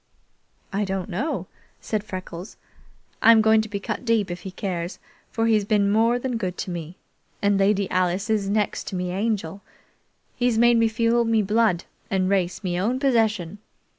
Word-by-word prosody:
"I 205 +2 0
don't 190 0 -3
know," 230 - -2 0.3
said 215 -2 -2
Freckles. 185 -2 -8 0.6
"I 230 - +8
am 225 - +7
going 220 0 +5
to 220 - -7
be 200 -1 -3
cut 200 - -4
deep 225 -6 +1
if 175 - -5
he 190 - -7
cares, 180 -2 -4 0.3
for 225 - -1
he's 220 -2 +3
been 200 -1 +2
more 230 +3 +3
than 245 -1 -2
good 185 -5 -3
to 185 - -4
me, 170 +1 -6 0.4
and 200 -1 +2
Lady 200 0 +2
Alice 185 +2 0
is 210 -3 0
next 210 0 -1
to - - -4
me 180 0 -2
Angel. 195 -2 -2 0.7
He's 245 -2 +1
made 240 +1 +5
me 230 0 +4
feel 230 +1 +2
me 225 -2 +2
blood 210 -3 +2 0.3
and 190 -1 +1
race 190 -1 0
me 175 -1 -1
own 230 +7 0
possession. 220 - +1
205 Hz, 180 wpm, -24 LUFS, 185-225 Hz, 0.7 s, I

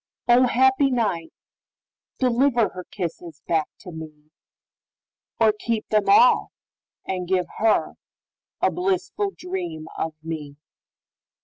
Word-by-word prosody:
O, 250 +1 +6
happy 265 +3 +3
night, 205 -10 -1 0.9
deliverHer 240 -7 +1
kisses 170 -4 -6
back 160 -2 +1
to 180 - -9
me, 155 -2 -11 1.1
Or 220 -2 +5
keep 220 +1 -3
them 210 -2 +2
all, 245 +5 +6 0.6
and 180 -1 -3
give 185 -1 +1
herA 220 0 +2 0.8
blissful 380 +2 -1
dream 175 -4 -5
of 160 -1 -3
me! 155 -3 -6
195 Hz, 100 wpm, -23 LUFS, 165-240 Hz, 1.1 s, O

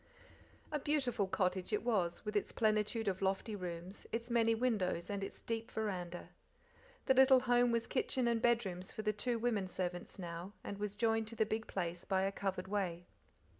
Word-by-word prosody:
A 300 - 0
beautiful 260 -8 +1
cottage 185 0 0
it 210 - +1
was, 195 -8 0
with 210 - -3
its 205 - +1
plenitude 215 0 +1
of 190 -1 0
lofty 195 +3 0
rooms, 180 0 -6
its 235 +1 -3
many 230 -1 +4
windows, 205 -7 0
and 200 -1 -2
its - - -6
deep 225 0 -3
veranda. 180 -5 -3 0.8
The - - +5
little 265 0 +7
home 245 -1 +4
was 230 0 +1
kitchen 255 -1 0
and 230 -1 +2
bedrooms 200 -7 +1
for 215 - -5
the 215 0 +1
two 235 +3 -1
women 220 -5 0
servants 180 0 -3
now, 175 +1 -6
and 200 - -5
was 205 -1 -3
joined 225 0 +1
to 230 - -7
the 220 - +2
big 220 +1 -2
place 175 -2 -2
by 190 -1 +1
a 195 - +1
covered 195 -1 -3
way. 185 -4 -2
210 Hz, 185 wpm, -36 LUFS, 185-230 Hz, 0.8 s, little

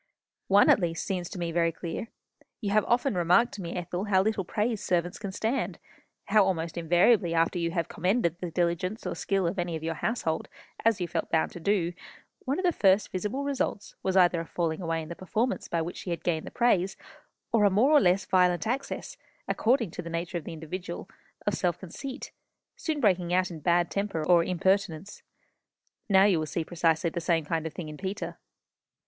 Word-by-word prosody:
"One, 200 +1 +6
at - - +5
least, 165 -3 -2
seems 180 -4 -3
to - - -8
me 170 -1 -2
very 165 0 +2
clear. 170 +6 -5 0.5
You 205 -4 -2
have 215 0 +4
often 245 +2 +2
remarked 180 +7 +3
to 205 - -6
me, 170 -1 -5
Ethel, 180 +2 -3
how 190 -2 +3
little 215 -2 0
praise 210 +3 -1
servants 175 0 0
can 200 -2 -5
stand; 225 +7 -1 0.5
how 215 -2 +5
almost 170 -4 -1
invariably 175 +2 +3
after 165 +2 +2
you 170 0 0
have 170 -1 -1
commended 180 -2 0
the 180 - -4
diligence 175 +4 -1
or - - -2
skill 195 -2 0
of 175 +3 -1
any 175 -1 -1
of 160 - -6
your 165 0 -1
household, 165 -3 -2 0.4
as 225 -3 +3
you 175 - -1
felt 165 0 -3
bound 160 - +1
to - - -8
do, 175 -1 +1 0.5
one 275 +1 0
of 370 - -1
the 355 - +4
first 195 - +3
visible 210 +9 -2
results 275 -7 -2
was 190 0 0
either 175 -2 +4
a - - -6
falling 165 -1 -2
away 165 -2 -1
in 155 - -10
the 170 - -5
performance 220 +8 -2
by 170 -1 -1
which 175 - -6
she - - -7
had 170 - -3
gained 160 -3 -1
the - - -4
praise, 195 -6 +1 0.5
or 225 -2 +3
a 205 - +6
more 220 +9 +3
or 295 -2 +7
less 185 0 +3
violent 180 0 +3
access, 260 +5 -3 0.3
according 230 - +1
to 180 - -5
the 170 - -7
nature 170 +1 -3
of 155 - -15
the - - -6
individual, 175 +3 -6 0.4
of 205 - +1
self 180 -2 0
conceit, 260 - -7 0.4
soon 315 -3 -2
breaking 185 -7 +2
out 185 0 +1
in 165 - -7
bad 175 +2 +2
temper 200 -6 -2
or 175 0 +5
impertinence. 190 0 0 0.9
Now 190 -1 +6
you 190 -5 +3
will 155 - -2
see 160 +1 -2
precisely 165 -1 +1
the 170 - -3
same 165 -2 +1
kind 160 +1 -1
of 160 - -8
thing 170 - -5
in 150 0 -8
Peter." 195 +4 -5
180 Hz, 210 wpm, -28 LUFS, 170-205 Hz, 0.9 s, or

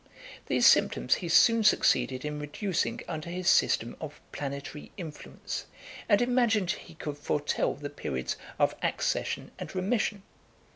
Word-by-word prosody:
These - - +2
symptoms - - +5
he 175 - -4
soon 230 +6 +6
succeeded 135 -9 +3
in 150 0 -3
reducing 165 +5 -2
under 160 0 -5
his 180 +1 -4
system 120 -9 +3
of 150 -2 -7
planetary 140 +1 -6
influence, 150 - -7 0.4
and 205 +4 +5
imagined 235 -6 +2
he 170 - -8
could 150 -2 -6
foretell 145 0 0
the 145 0 -7
periods 65 - -3 0.2
of - - +3
accession - - -1
and - - -7
remission. 200 +1 0
165 Hz, 135 wpm, -29 LUFS, 145-200 Hz, 0.4 s, soon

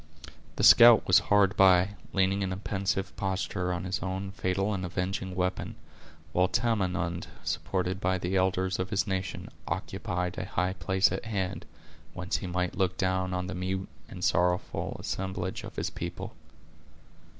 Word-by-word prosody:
The - - -2
scout 120 -1 +9
was 90 - +6
hard 100 -1 +4
by, 95 0 +6 0.2
leaning 95 +1 +1
in 95 -1 -1
a 95 - -3
pensive 95 -1 -2
posture 95 -1 -2
on 90 -1 -3
his 95 +1 -2
own 95 +1 -4
fatal 95 +2 -1
and 95 -2 -3
avenging 90 +1 -3
weapon; 90 0 -2 0.6
while 90 +1 +3
Tamenund, 90 -6 -1 0.2
supported 95 +1 -2
by 95 +1 +1
the 90 +1 -2
elders 95 0 +1
of 95 - -2
his 100 -4 +1
nation, 95 -2 -3 0.2
occupied 90 0 -3
a - - -3
high 90 +1 -1
place 95 0 +2
at 95 +5 -4
hand, 95 -5 -3 0.5
whence 90 0 -2
he 95 - -6
might 90 0 -1
look 95 -1 +1
down 95 0 0
on 90 0 -2
the 95 - -5
mute 95 +1 -3 0.2
and 90 -1 -8
sorrowful 90 0 0
assemblage 95 -1 -4
of - - -9
his - - -2
people. - - -6
95 Hz, 160 wpm, -29 LUFS, 90-95 Hz, 0.6 s, scout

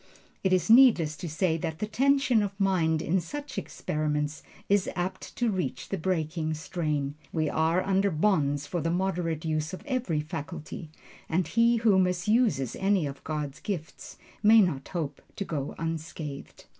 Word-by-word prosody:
It 190 - +2
is 185 -2 +2
needless 225 - +6
to 170 - -5
say 165 +1 +1
that 160 0 -4
the 210 - -2
tension 265 +1 +3
of 200 -1 -4
mind 170 -5 +2
in 185 +2 +1
such 290 - -5
experiments 150 0 -2 0.3
is 200 -1 +2
apt 185 +1 -4
to 240 -2 +1
reach 185 -2 -3
the 195 - -1
breaking 160 -2 -1
strain. 150 -4 -2 0.2
We 155 -2 0
are 165 +3 +2
under 195 +1 +2
bonds 150 -5 +1
for 170 +4 -3
the 165 - 0
moderate 170 -3 -1
use 155 +1 -1
of - - -14
every 255 - -1
faculty, 155 +2 -7 0.4
and 175 +2 +1
he 235 +1 +4
who 220 -4 +4
misuses 180 - +2
any 195 -3 +2
of 140 -1 -6
God's 150 -2 -4
gifts 170 -7 -6 0.2
may 220 +2 +7
not 160 -10 +1
hope 150 -6 -4
to 200 - -3
go 145 -5 -4
unscathed. 160 -3 -6
170 Hz, 160 wpm, -28 LUFS, 155-195 Hz, 0.4 s, may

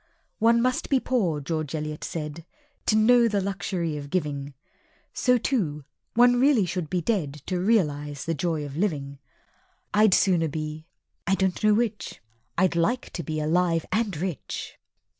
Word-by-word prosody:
"One 230 +1 +4
must 255 0 0
be 270 - +4
poor," 195 -13 0
George 155 +1 -3
Eliot 150 0 -4
said, 155 0 -5 0.4
"To 215 - +4
know 235 +2 +5
the 205 -2 +1
luxury 185 -5 -2
of 145 -1 -7
giving;" 145 -4 -2 0.6
So 250 0 +3
too 170 - -1 0.3
one 245 +1 +5
really 260 -6 +4
should 175 -3 -3
be 180 +1 0
dead 155 - -2
To 180 -1 -1
realize 150 -9 0
the 165 - 0
joy 160 -1 -1
of 140 -1 -8
living. 145 -7 -2 0.7
(I'd 210 -2 +5
sooner 175 -4 +3
be 155 +1 -5 0.4
I 195 - +3
don't 190 +1 -1
know 215 -1 +5
which 225 -2 -2 0.4
I'd 185 -1 +2
like 235 +10 0
to 175 - -4
be 155 -1 -3
alive 165 +1 +1
and 210 -4 0
rich!) 175 -2 -5
175 Hz, 160 wpm, -26 LUFS, 150-215 Hz, 0.7 s, know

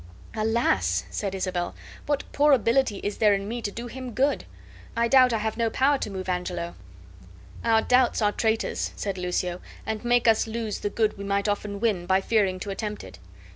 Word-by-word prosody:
"Alas!" 215 - +1
said 195 -2 -3
Isabel, 185 -2 -2 0.3
"what 290 -1 0
poor 295 0 +4
ability 235 -3 +2
is 205 - -3
there 210 -2 +5
in 195 0 -4
me 235 +2 -4
to 210 - -2
do 235 +4 -7
him 250 0 -7
good? 275 +2 +1 0.5
I 235 0 +3
doubt 255 0 +6
I 225 - +1
have 220 0 -2
no 230 -1 +1
power 275 +4 +2
to - - -3
move 190 -2 -5
Angelo." 180 -1 -2 0.9
"Our 225 -1 +3
doubts 250 0 +3
are 210 -2 +3
traitors," 220 +1 -1
said 195 -2 -3
Lucio, 180 0 -2 0.2
"and 220 0 -3
make 240 0 +3
us 225 0 +4
lose 225 -2 -3
the 205 - -2
good 215 -1 0
we - - -5
might 200 +1 0
often 205 0 -2
win, 200 -6 0
by 190 0 +4
fearing 195 -2 +1
to 200 - -4
attempt 210 +1 -4
it. - - -12
215 Hz, 195 wpm, -26 LUFS, 195-235 Hz, 0.9 s, doubt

